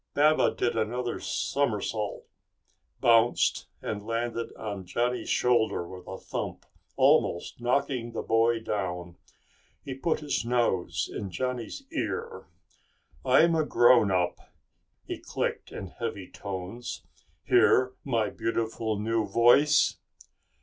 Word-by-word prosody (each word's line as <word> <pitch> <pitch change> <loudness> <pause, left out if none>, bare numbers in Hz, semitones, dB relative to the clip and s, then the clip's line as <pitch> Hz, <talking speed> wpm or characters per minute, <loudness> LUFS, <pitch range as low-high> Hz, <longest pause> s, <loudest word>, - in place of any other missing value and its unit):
Baba 155 +2 +4
did 120 -1 0
another 120 +2 -2
somersault, 110 -5 -2 0.8
bounced, 115 0 +3 0.2
and 105 -1 -4
landed 115 +1 -3
on 100 -3 -5
Johnny's 120 +7 -1
shoulder 120 -8 +2
with 90 0 -11
a 95 - -6
thump, - - -5 0.3
almost 85 +7 +2
knocking 125 -1 0
the - - -4
boy 115 0 +2
down. 90 -5 -4 0.7
He 135 - -4
put 155 +5 -1
his 145 -5 -1
nose 115 -7 0
in 100 - -4
Johnny's 125 - -4
ear. 460 +7 -4 0.8
"I'm 170 +1 +5
a 160 -1 +2
grown 120 -6 +5
up," 90 -2 0 0.7
he - - -5
clicked - - -3
in 95 - -7
heavy 110 -5 -5
tones. 100 +5 -6 0.4
"Hear 130 0 +4
my 115 -6 0
beautiful 115 -1 -2
new 110 0 0
voice?" 120 +8 +4
115 Hz, 115 wpm, -28 LUFS, 105-125 Hz, 0.8 s, I'm